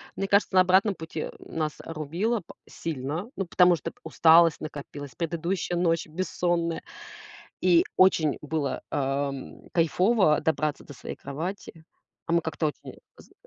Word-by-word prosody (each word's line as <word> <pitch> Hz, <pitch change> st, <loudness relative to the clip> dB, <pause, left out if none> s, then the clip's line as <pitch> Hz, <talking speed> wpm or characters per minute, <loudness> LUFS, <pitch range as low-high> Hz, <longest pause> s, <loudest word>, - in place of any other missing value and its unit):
Мне 195 Hz, -, -2 dB
кажется, 200 Hz, -1 st, +2 dB
на 185 Hz, -, +8 dB
обратном 190 Hz, +2 st, +3 dB
пути, 160 Hz, -1 st, -6 dB
э, -, -, -4 dB
нас 155 Hz, -2 st, -3 dB
рубило 165 Hz, +9 st, -2 dB
п 175 Hz, -, -14 dB
сильно, 160 Hz, -, -4 dB
ну 195 Hz, -, -2 dB
потому 180 Hz, +1 st, +5 dB
что 165 Hz, 0 st, -6 dB
п -, -, -31 dB
усталость 165 Hz, 0 st, +5 dB
накопилась, 145 Hz, -2 st, -8 dB
предыдущая 170 Hz, +1 st, -2 dB
ночь 165 Hz, -2 st, +1 dB
бессонная, 170 Hz, 0 st, -1 dB, 0.8 s
и 175 Hz, -2 st, +5 dB
очень 165 Hz, -6 st, +4 dB
было, 150 Hz, -2 st, -2 dB
ам, 140 Hz, -1 st, -3 dB
кайфово 175 Hz, +1 st, +3 dB
добраться 155 Hz, -1 st, -1 dB
до 145 Hz, -, -10 dB
своей -, -, -7 dB
кровати, 160 Hz, +3 st, -6 dB, 0.4 s
а 165 Hz, -, -4 dB
мы 170 Hz, -, +3 dB
как-то 160 Hz, -1 st, -2 dB
очень 150 Hz, -, -8 dB, 0.2 s
поздно -, -, -18 dB
165 Hz, 145 wpm, -26 LUFS, 155-180 Hz, 0.8 s, на